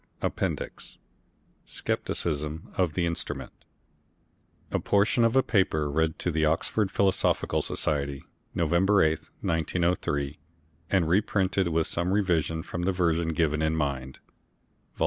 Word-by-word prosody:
APPENDIX - - -3 0.7
SCEPTICISM 75 0 -3
OF 90 -4 +1
THE 85 +1 0
INSTRUMENT 85 -1 -3 1.2
A - - +1
Portion 110 +4 +2
of 115 +2 +3
a 135 - +5
Paper 80 - +1
read 80 +1 +1
to 90 - -1
the 80 0 0
Oxford 85 +6 +1
Philosophical 100 -1 +1
Society, 70 -2 -1 0.3
November 85 +5 +3
8, 80 0 0
1903, 80 -3 -1 0.5
and 95 -4 +2
reprinted, 95 0 +2
with 80 -1 +1
some 85 +2 -1
Revision, 85 -5 +1
from 85 - -5
the 90 +2 +1
Version 85 -2 +1
given 80 -1 +1
in 80 0 +1
Mind, 70 -4 -2 0.8
vol. - - -20
85 Hz, 125 wpm, -27 LUFS, 80-95 Hz, 1.2 s, a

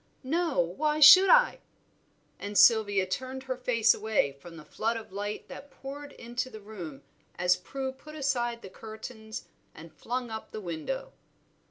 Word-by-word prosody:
"No, 325 +2 0
why 300 - 0
should 370 +6 +10
I?" - - +5 0.8
And 205 0 -4
Sylvia 205 -4 +5
turned 260 +8 -5
her 260 -1 -3
face 240 -3 +3
away 215 -9 0
from 165 +5 -13
the 155 - -12
flood 230 +1 -2
of 225 - -10
light 205 +1 -5
that 285 - -10
poured 285 +1 -9
into 240 +2 -5
the 220 - -10
room 185 -9 -9 0.3
as 180 +1 +3
Prue 265 +8 -5
put 305 +4 -13
aside 240 -5 -1
the - - -8
curtains 220 +1 -9 0.3
and 160 +1 -12
flung 245 - -4
up 220 0 -6
the - - -7
window. 185 - -5
230 Hz, 160 wpm, -29 LUFS, 200-270 Hz, 0.8 s, should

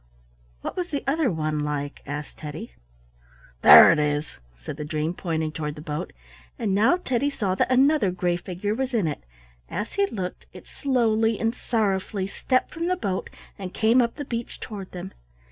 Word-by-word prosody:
"What - - -5
was 360 -1 -3
the 285 - -3
other 280 0 +2
one 155 -2 -1
like?" 145 -1 -3
asked 145 +1 -6
Teddy. 150 - -7 0.9
"There 75 - +10
it 165 - +2
is," 150 0 0 0.2
said - - -7
the 150 - -4
dream, 155 +1 -2
pointing 160 -3 -2
toward 150 -1 -4
the 150 - -9
boat. 150 -1 -4 0.5
And 205 -4 -1
now 220 - +4
Teddy 275 -5 0
saw 205 -9 -1
that 190 - +1
another 270 -3 +4
gray 180 -1 0
figure 185 +4 -3
was 260 +2 -2
in 210 -6 +2
it. 150 - -3 0.5
As 210 - -4
he 400 0 +2
looked, 185 - -5
it - - -12
slowly 230 -5 +1
and 225 0 +1
sorrowfully 200 -5 -1
stepped 255 +6 -1
from 335 +1 -2
the 365 - +2
boat 190 - -2 0.3
and 185 -2 -6
came 230 +3 +4
up 235 -1 -1
the 290 - -5
beach 235 -2 -5
toward 200 -4 -7
them. 180 +1 -7
195 Hz, 180 wpm, -25 LUFS, 155-245 Hz, 0.9 s, There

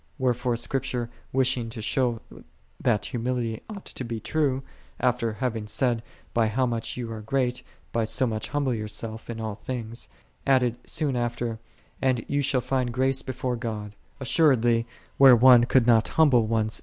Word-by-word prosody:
Wherefore 125 -2 0
Scripture 120 0 -2 0.2
wishing 130 -3 +1
to 115 0 -8
show 120 +1 0 0.6
that 110 -4 +2
humility 120 -2 -2
ought 205 -3 -8
to - - -6
be 115 -2 -4
true, 135 -1 0 0.4
after 125 -3 +1
having 110 -2 -3
said, 120 0 +1 0.3
"By 115 -2 +3
how 125 +4 +1
much 115 -2 -2
thou 120 -2 -5
art 110 -1 -7
great, 125 -1 0 0.3
by 115 -1 0
so 130 +4 +1
much 110 -3 -2
humble 145 -3 0
thyself 110 0 -5
in 115 -1 -5
all 110 -1 -3
things," 115 +2 -6 0.4
added 125 -3 +3
soon 145 -5 -1
after, 120 -1 -2 0.4
"And 130 -3 +1
thou 145 0 0
shall 130 -2 +1
find 130 -1 -1
grace 130 +2 +1
before 130 -1 -3
God:"1 110 -3 -4 0.3
assuredly 120 -5 +3 0.3
where 135 -2 +9
one 120 0 +7
could 130 -1 +3
not 115 -2 +4
humble 130 -8 +4
one's - - -6
self 110 -1 +1
deceitfully. 110 - -4
120 Hz, 170 wpm, -26 LUFS, 115-130 Hz, 0.6 s, where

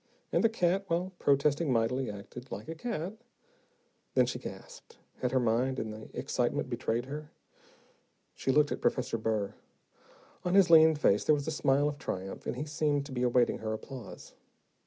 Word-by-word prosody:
And - - +2
the 225 - +5
cat, 195 -2 +1
while 175 +2 -1
protesting 145 +2 +2
mightily, 125 +2 +1
acted 110 +5 -9
like 105 - -6
a 165 - -4
cat. 185 0 -4 1.0
Then - - +5
she - - -4
gasped. 485 -1 -10 0.2
Had 125 - -1
her 130 - +3
mind, 125 +3 +1
in 110 - -3
the 110 0 -9
excitement, - - -1
betrayed 115 +2 -1
her? 150 +2 -7 1.0
She 135 - -1
looked 150 +1 +3
at - - -3
Professor 125 -3 0
Burr. 110 -2 -1 0.9
On 180 +1 +1
his 195 -3 +6
lean 160 -1 +8
face 105 -9 +3
there 155 - +4
was 145 0 -4
a - - 0
smile 145 -1 +2
of 150 -1 -4
triumph, 95 +1 -5
and - - -2
he 140 +4 -3
seemed 150 -2 0
to 140 - -10
be 125 -1 -3
awaiting 125 -1 +2
her 110 0 -3
applause. 115 -1 -9
140 Hz, 180 wpm, -31 LUFS, 120-160 Hz, 1.0 s, lean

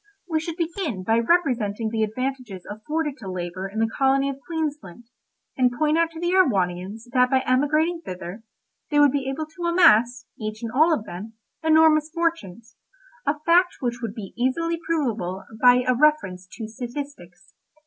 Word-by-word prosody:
We 320 -3 0
should 325 +1 -5
begin 330 - -3
by 225 +4 +2
representing 235 - +1
the 225 -1 -1
advantages 225 -3 -3
afforded 295 +8 -3
to 195 - -7
labour 185 +1 -4
in 205 - -9
the 225 - +3
colony 275 0 +2
of 275 - -10
Queensland, 295 - -4 0.5
and 250 -1 +3
point 305 +2 +2
out 335 0 +2
to 325 - -8
the 345 +1 0
Erewhonians 200 - +1
that 250 -1 +3
by 265 0 +3
emigrating 305 +7 +1
thither, 185 - -7 0.5
they 295 - +2
would 290 -2 +6
be 270 -1 -2
able 300 +4 -3
to 340 +3 -7
amass, 245 -9 +4
each 215 +1 -5
and 230 - -3
all 310 +7 +4
of 245 -9 0
them, 205 +6 -8 0.3
enormous 315 -1 +4
fortunes—a 330 - -4
fact 355 +2 +4
which 240 -2 -2
would 225 -3 -4
be 200 -4 -8
easily 330 +7 0
provable 225 - -1 0.2
by 250 0 +6
a 255 - +3
reference 240 -10 +1
to 225 -2 -6
statistics. 225 -7 -8
255 Hz, 165 wpm, -24 LUFS, 215-315 Hz, 0.5 s, would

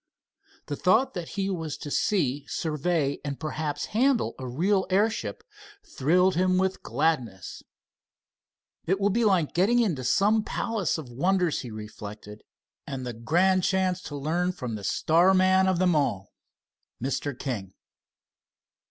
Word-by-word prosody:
The 145 - -4
thought 220 - +2
that 175 -3 -5
he 195 -1 0
was 165 -6 -3
to 145 - -7
see, 145 -9 0
survey 155 -2 -1
and 140 -1 -4
perhaps 155 -1 -3
handle 255 +2 +2
a 130 - -5
real 190 +10 +1
airship 190 - 0 0.4
thrilled 180 +7 +2
him 185 +1 +2
with 190 0 0
gladness. 125 - -2 1.3
"It 190 +3 +1
will 200 +1 +2
be 235 +4 +1
like 185 -8 +2
getting 200 +8 +3
into 185 - +1
some 210 - +3
palace 215 -4 -1
of 140 -6 -8
wonders," 180 +5 +1
he 125 - -7
reflected, 105 -1 -9 0.5
"and 130 -2 -5
the 120 - -4
grand 175 +11 +2
chance 185 0 +1
to 145 - -6
learn 170 +6 -1
from 125 -8 -5
the 105 -2 -6
star 170 - +3
man 185 0 +4
of 185 -2 +2
them 180 -1 +2
all, 100 -10 -1 0.7
Mr. 135 +1 -3
King." 105 -10 -5
165 Hz, 145 wpm, -26 LUFS, 135-190 Hz, 1.3 s, man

